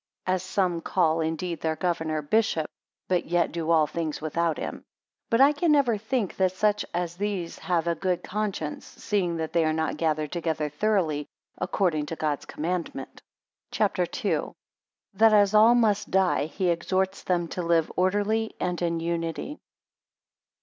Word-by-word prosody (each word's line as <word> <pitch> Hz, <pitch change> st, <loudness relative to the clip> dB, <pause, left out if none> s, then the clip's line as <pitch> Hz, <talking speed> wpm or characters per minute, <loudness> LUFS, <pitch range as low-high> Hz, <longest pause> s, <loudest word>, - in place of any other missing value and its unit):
10 185 Hz, -, +1 dB
As 185 Hz, -, 0 dB
some 185 Hz, -2 st, 0 dB
call 165 Hz, -3 st, +1 dB
indeed 165 Hz, +1 st, -3 dB
their 160 Hz, -1 st, 0 dB
governor, 160 Hz, -3 st, -1 dB
bishop; 170 Hz, -2 st, +1 dB, 0.4 s
but 180 Hz, -1 st, +1 dB
yet 175 Hz, 0 st, +1 dB
do 165 Hz, -1 st, -3 dB
all 160 Hz, -2 st, +5 dB
things 160 Hz, -1 st, -3 dB
without 160 Hz, +1 st, -1 dB
him. -, -, -4 dB
11 -, -, -12 dB, 0.5 s
But 230 Hz, +3 st, +3 dB
I 280 Hz, +2 st, +8 dB
can 310 Hz, +2 st, +1 dB
never 275 Hz, -6 st, +4 dB
think 220 Hz, 0 st, -2 dB
that 185 Hz, -1 st, +2 dB
such 210 Hz, +2 st, +1 dB
as 175 Hz, 0 st, -3 dB
these 195 Hz, -4 st, -3 dB
have 170 Hz, -3 st, 0 dB
a 170 Hz, -, +1 dB
good 180 Hz, +1 st, -1 dB
conscience, 200 Hz, -7 st, -3 dB
seeing 180 Hz, -5 st, -2 dB
that 160 Hz, -1 st, -4 dB
they 170 Hz, -1 st, +3 dB
are 155 Hz, 0 st, +1 dB
not 160 Hz, -1 st, -1 dB
gathered 155 Hz, -2 st, 0 dB
together 160 Hz, -3 st, -1 dB
thoroughly 155 Hz, -3 st, 0 dB, 0.3 s
according 155 Hz, -7 st, 0 dB
to 165 Hz, -, -4 dB
God's 150 Hz, -3 st, -2 dB
commandment. 165 Hz, -4 st, -4 dB, 0.5 s
CHAPTER -, -, +1 dB, 0.2 s
II. -, -, +3 dB
1 -, -, -6 dB, 0.6 s
That 220 Hz, +2 st, +5 dB
as 205 Hz, -1 st, +5 dB
all 220 Hz, +3 st, +7 dB
must 220 Hz, -4 st, +2 dB
die, 185 Hz, -5 st, +2 dB
4 -, -, -20 dB
he 185 Hz, -2 st, +1 dB
exhorts 190 Hz, +3 st, 0 dB
them 175 Hz, -2 st, 0 dB
to 180 Hz, -, -3 dB
live 165 Hz, -2 st, +2 dB
orderly 205 Hz, +4 st, +1 dB
and 180 Hz, -1 st, -2 dB
in 170 Hz, -1 st, 0 dB
unity. 170 Hz, -, -3 dB
175 Hz, 170 wpm, -26 LUFS, 160-200 Hz, 0.6 s, I